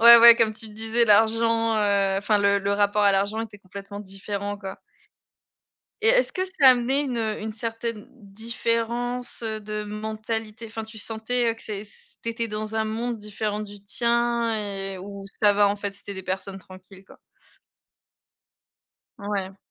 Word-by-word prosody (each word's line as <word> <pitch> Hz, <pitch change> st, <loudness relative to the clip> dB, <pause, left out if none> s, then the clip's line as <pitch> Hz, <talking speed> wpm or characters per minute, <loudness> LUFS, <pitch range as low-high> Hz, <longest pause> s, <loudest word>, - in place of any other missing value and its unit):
Ouais, 235 Hz, +1 st, +11 dB
ouais 235 Hz, 0 st, +10 dB
comme 225 Hz, -2 st, +2 dB
tu 220 Hz, +1 st, -8 dB
le 210 Hz, -, -14 dB
disais 225 Hz, +2 st, +1 dB
l'argent, 225 Hz, +1 st, +4 dB
heu, 200 Hz, -2 st, +2 dB
enfin 210 Hz, +2 st, +2 dB
le 200 Hz, 0 st, +3 dB
le 200 Hz, 0 st, -1 dB
rapport 205 Hz, +1 st, +2 dB
à 200 Hz, -1 st, +5 dB
l'argent 200 Hz, +3 st, 0 dB
était 220 Hz, -2 st, -7 dB
complètement 200 Hz, +1 st, -9 dB
différent, 200 Hz, +1 st, -5 dB
quoi. 195 Hz, -2 st, -7 dB, 1.2 s
Et 445 Hz, -, +4 dB
est-ce -, -, +4 dB
que 370 Hz, -, -1 dB
ça 375 Hz, -7 st, +3 dB
a -, -, +12 dB
amené 250 Hz, +3 st, +1 dB
une, 265 Hz, -4 st, -2 dB
heu, 220 Hz, -2 st, -2 dB
une 215 Hz, +1 st, -4 dB
certaine 230 Hz, -1 st, -5 dB
différence, 235 Hz, +3 st, -3 dB
heu, 220 Hz, -1 st, -3 dB
de 210 Hz, 0 st, -4 dB
mentalité 220 Hz, +1 st, -4 dB
enfin 225 Hz, 0 st, -6 dB
tu 220 Hz, 0 st, -11 dB
sentais 230 Hz, +2 st, -1 dB
que 225 Hz, -, -10 dB
c'est 210 Hz, -1 st, -4 dB
c 205 Hz, -, -12 dB
t'étais 230 Hz, 0 st, -2 dB
dans 215 Hz, +1 st, -4 dB
un 220 Hz, 0 st, +1 dB
monde 230 Hz, +2 st, -2 dB
différent 210 Hz, 0 st, -4 dB
du 205 Hz, -1 st, -9 dB
tien 235 Hz, +2 st, +1 dB
et 195 Hz, -2 st, -5 dB
où 200 Hz, +1 st, -8 dB, 0.2 s
ça 205 Hz, -1 st, +5 dB
va 205 Hz, 0 st, +5 dB
en 200 Hz, -, 0 dB
fait 205 Hz, -1 st, -3 dB
c'étaient 200 Hz, 0 st, -7 dB
des 190 Hz, -, -5 dB
personnes 190 Hz, +1 st, -4 dB
tranquilles, 185 Hz, +1 st, -15 dB
quoi? -, -, -17 dB, 2.0 s
Ouais. 200 Hz, -2 st, -4 dB
215 Hz, 175 wpm, -25 LUFS, 200-230 Hz, 2.0 s, a